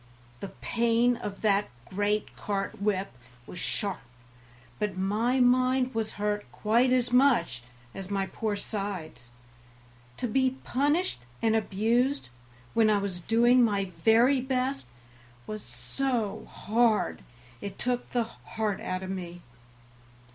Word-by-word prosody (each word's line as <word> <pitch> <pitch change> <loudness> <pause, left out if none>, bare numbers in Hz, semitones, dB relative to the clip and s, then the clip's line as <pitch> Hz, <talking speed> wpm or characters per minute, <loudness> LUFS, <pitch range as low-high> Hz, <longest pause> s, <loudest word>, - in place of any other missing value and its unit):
The - - -5
pain 235 +1 +2
of 205 -4 -7
that 205 -1 +2 0.2
great 205 +2 -1
cart 200 -1 -3
whip 200 -2 0 0.3
was 180 - -9
sharp, 200 +1 -2 0.8
but 210 -3 -2
my 215 +7 +1
mind 255 +1 +3
was 225 -1 -2
hurt 210 0 -2
quite 235 +4 +2
as 250 -1 +2
much 245 - +3 0.3
as 195 -1 -7
my 195 -1 0
poor 215 +2 -2
sides. 195 - -5 0.9
To 245 - -2
be 260 +2 +1
punished 290 - +1 0.2
and 225 -1 +3
abused 225 - +1 0.4
when 225 -1 +4
I 210 - +4
was 195 -3 -3
doing 240 +5 +4
my 200 -4 +1
very 225 +10 +3
best 260 - -1 0.6
was 215 0 -5
so 200 - -2
hard 225 0 +1 0.4
it 200 - -6
took 245 0 -1
the 240 -1 +1
heart 220 -2 -4
out 185 0 -3
of 190 - -4
me. 175 -2 -6
215 Hz, 125 wpm, -28 LUFS, 195-245 Hz, 0.9 s, when